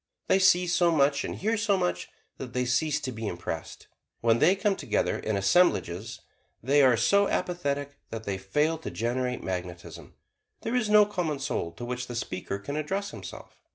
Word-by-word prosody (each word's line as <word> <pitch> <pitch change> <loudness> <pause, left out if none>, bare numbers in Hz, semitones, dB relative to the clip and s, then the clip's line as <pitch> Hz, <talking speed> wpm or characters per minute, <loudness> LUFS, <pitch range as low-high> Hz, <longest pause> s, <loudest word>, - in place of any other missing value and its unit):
They 190 - +4
see 180 -1 +5
so 175 0 +3
much 140 -3 +2
and - - -4
hear 220 +3 0
so 210 -2 +2
much 90 - -2 0.3
that 125 -2 -7
they 125 0 0
cease 150 +4 +1
to 130 - -3
be 110 -2 -5
impressed. 85 -3 -6 0.4
When 115 0 +3
they 185 - +5
come 200 0 +1
together 140 - -1
in 110 -2 -1
assemblages 110 - +1 0.4
they 140 +4 +4
are 130 -3 +5
so 200 - +3
apathetic 145 -5 -2
that 110 -1 -6
they 100 -3 -3
fail 150 +12 0
to - - -6
generate 125 +2 -2
magnetism 85 -3 -6 0.5
there 225 - -2
is 245 -4 +1
no 210 0 +7
common 175 -7 -2
soul 135 - -3
to 120 - -7
which 125 0 -4
the 120 - -6
speaker 100 -4 -4
can 140 +9 -5
address 195 +7 -2
himself. - - -10
140 Hz, 185 wpm, -27 LUFS, 110-175 Hz, 0.5 s, no